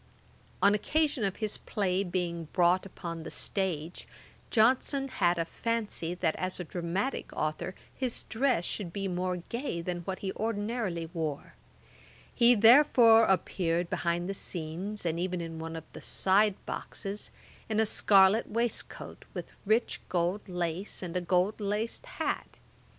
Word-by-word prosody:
] - - -30
On 200 - +7
occasion 290 +4 +1
of 195 -2 0
his 215 -2 -2
play 190 -2 0
being 175 -2 -2
brought 180 +2 +3
upon 170 -3 -6
the - - -7
stage, 175 -4 -3 0.4
Johnson 260 +4 +3
had 175 -7 +2
a 165 - 0
fancy 210 -5 -2
that 170 -3 0
as 185 0 -2
a - - -2
dramatick 180 - -2
authour 155 +4 -2 0.2
his 255 -3 -2
dress 235 -7 +1
should 190 -5 -3
be 195 +2 -3
more 180 0 -1
gay 235 -7 -3
than 175 +1 -3
what 190 +2 -4
he 190 - -1
ordinarily 210 -5 -2
wore; 155 -4 -3 0.8
he 240 0 +6
therefore 230 -1 +7
appeared 175 -2 0
behind 170 +1 0
the 195 - -2
scenes, 180 +3 -4
and 165 0 0
even 180 0 -1
in 165 -1 -5
one 165 0 -5
of 160 - -6
the - - -9
side 200 +1 +3
boxes, 200 +1 -5 0.4
in 220 0 +1
a 220 - +4
scarlet 200 0 +5
waistcoat, 235 +1 -3
with - - -6
rich 220 +3 +2
gold 180 +3 0
lace, 180 +2 -3
and 175 -1 -5
a 180 - +1
gold 180 +4 +1
laced 210 - -2
hat. - - -3
190 Hz, 150 wpm, -30 LUFS, 175-220 Hz, 0.8 s, On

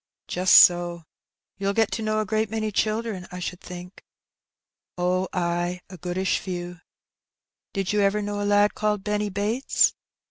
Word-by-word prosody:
"Just 180 +1 +3
so; 175 -1 +6 0.6
you'll 200 0 -1
get 225 -2 +2
to 225 - -2
know 215 0 0
a - - -2
great 215 +1 0
many 215 0 -2
children, 215 -3 -1
I 180 - -7
should 180 0 -5
think? 180 +1 -10 0.5
*' - - -64
"Oh, 180 +1 0
ay, 175 0 -1
a 185 - -9
goodish 180 +3 -1
few." 175 -2 -6 0.5
'' - - -66
Did 195 0 -1
you 210 - +2
ever 200 +1 +2
know 205 0 -3
a 205 0 0
lad 205 0 +4
called 210 -2 -1
Benny 210 0 -1
Bates 210 +7 +1
195 Hz, 170 wpm, -25 LUFS, 180-210 Hz, 0.6 s, so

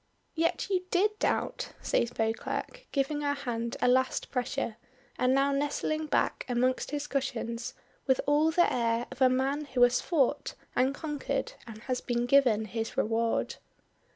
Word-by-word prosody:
"Yet 330 0 0
you 365 -1 +1
did 420 +4 +2
doubt," - - -1
says 235 - +1
Beauclerk, 230 - -3
giving 290 +1 0
her 285 0 0
hand 235 -4 -3
a - - +5
last 260 +1 +2
pressure, 250 -3 -2 0.4
and 255 - +3
now 275 +1 +3
nestling 295 +2 -1
back - - +1
amongst 250 +1 +1
his 295 0 -3
cushions 245 -4 -3 0.3
with 265 -1 +3
all 295 +2 +4
the 345 +2 +3
air 235 -1 +1
of 260 +1 -10
a 260 - +7
man 270 +4 0
who 255 -3 +2
has 245 0 +4
fought 290 -4 0 0.2
and 260 +2 +2
conquered 295 -2 -3
and 220 -1 -10
has 255 -2 -2
been 240 -1 -1
given 245 -5 +4
his 225 +4 -4
reward. 230 -2 0
260 Hz, 155 wpm, -29 LUFS, 240-290 Hz, 0.4 s, a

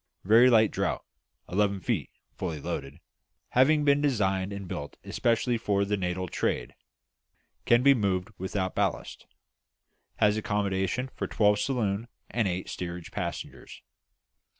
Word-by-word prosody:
Very 115 +6 +6
light 110 -3 +5
draught - - -2 0.4
(11 100 0 0
feet, - - -1 0.2
fully 80 -5 -4
loaded), 70 0 -5 0.5
having 150 +4 +4
been 140 0 +4
designed 95 -8 +1
and 100 -1 -6
built - - -6
especially 115 0 0
for 100 -3 +1
the 105 +1 0
Natal 90 -1 -2
trade. - - -2 0.9
Can 120 +1 +4
be 140 0 +7
moved 100 -5 -1
without 95 0 -2
ballast. - - -2 0.9
Has 105 0 +3
accommodation 105 +4 -1
for - - -4
twelve 105 -1 +3
saloon 115 -4 -1 0.2
and 115 -4 +1
eight 90 0 -3
steerage 85 -1 -6
passengers. - - -6
105 Hz, 125 wpm, -28 LUFS, 95-120 Hz, 0.9 s, be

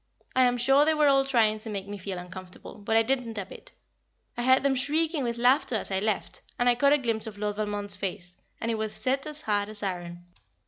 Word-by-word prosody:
I 255 0 +5
am 245 0 +2
sure 270 +4 +4
they 315 +1 +2
were 300 -1 +4
all 275 -1 +4
trying 225 -5 +2
to 220 - -4
make 200 -2 -4
me 205 0 -7
feel 190 0 -5
uncomfortable, 180 +2 -8
but 220 +2 +1
I 225 - +5
didn't 240 -2 -1
a 200 - -3
bit. - - -11 0.6
I - - -3
heard 260 +2 +4
them 280 -1 +3
shrieking 305 +3 0
with 235 -1 -2
laughter 250 +1 +3
as 215 - -2
I 190 - +1
left, 215 0 -2 0.2
and 245 - +1
I 245 - +6
caught 280 +4 +3
a - - +5
glimpse 230 -5 0
of 210 -2 -8
Lord 205 0 -3
Valmond's 205 -1 -2
face, 185 -2 -5 0.2
and 230 - -2
it 225 - -2
was 215 -1 -1
set 270 +3 0
as 305 0 -5
hard 205 -1 0
as 215 -1 -4
iron. 175 -2 -5
225 Hz, 240 wpm, -27 LUFS, 205-265 Hz, 0.6 s, I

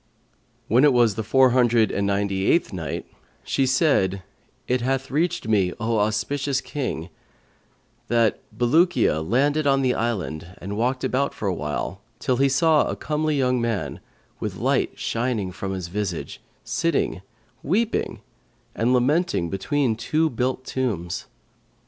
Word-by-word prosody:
When 125 +5 +4
it 145 -2 +6
was 120 -3 +4
the 110 - -3
Four 130 +4 +4
Hundred 120 -3 +3
and 100 0 0
Ninety 100 -1 0
eighth 170 - +2
Night, 80 -6 -4 0.4
She 135 - +1
said, 125 - +2 0.4
It 125 0 +1
hath 135 +2 -1
reached 170 0 0
me, 95 -5 +2
O 115 -1 0
auspicious 130 +6 0
King, 125 - -4 1.0
that 115 -2 +2
"Bulukiya 120 - +2
landed 145 - +1
on 135 -1 +3
the 125 -1 +2
island 90 -7 -3
and 100 +3 -6
walked 125 +4 0
about 140 +2 0
for 105 - -3
a 95 - +1
while, 80 +5 -4 0.2
till 130 -2 0
he 135 +1 +3
saw 155 +3 +3
a - - -2
comely 155 0 -1
young 125 -2 +1
man 115 -4 -2 0.4
with - - -4
light - - 0
shining 115 -5 -1
from 95 +1 -5
his 95 -3 -4
visage, 95 -2 -4 0.2
sitting 165 - 0 0.4
weeping 220 +8 -1 0.5
and 120 +3 +1
lamenting 130 - +1
between 120 +5 0
two 155 +8 0
built 130 +2 -2
tombs. 100 -10 -3
120 Hz, 145 wpm, -24 LUFS, 100-135 Hz, 1.0 s, it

